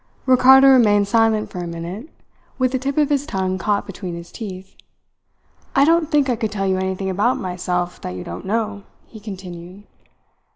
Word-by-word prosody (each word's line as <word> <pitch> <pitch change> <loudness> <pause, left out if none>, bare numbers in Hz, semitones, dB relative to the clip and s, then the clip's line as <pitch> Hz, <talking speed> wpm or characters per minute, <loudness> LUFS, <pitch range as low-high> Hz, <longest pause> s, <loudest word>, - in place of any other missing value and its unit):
Ricardo 265 +1 +7
remained 210 -6 +5
silent 225 0 +2
for 180 - -6
a 175 - -4
minute, 170 - -7 0.5
with 255 -1 +1
the 260 - -1
tip 275 +2 -3
of 300 -1 +3
his 285 0 0
tongue 185 -1 -2
caught 205 +1 0
between 185 -3 -7
his 170 0 -10
teeth. 190 -4 -8 1.0
"I 275 0 +5
don't 330 0 +2
think 295 -3 +2
I 250 - +1
could 220 -2 -3
tell 195 -2 -2
you 190 -1 +1
anything 190 0 -2
about 210 +7 +1
myself 180 -1 -3
that 90 - -6
you 90 - -6
don't 85 +1 -8
know," 215 -1 -2 0.2
he 220 - -13
continued. 185 -2 -9
205 Hz, 180 wpm, -20 LUFS, 185-255 Hz, 1.0 s, Ricardo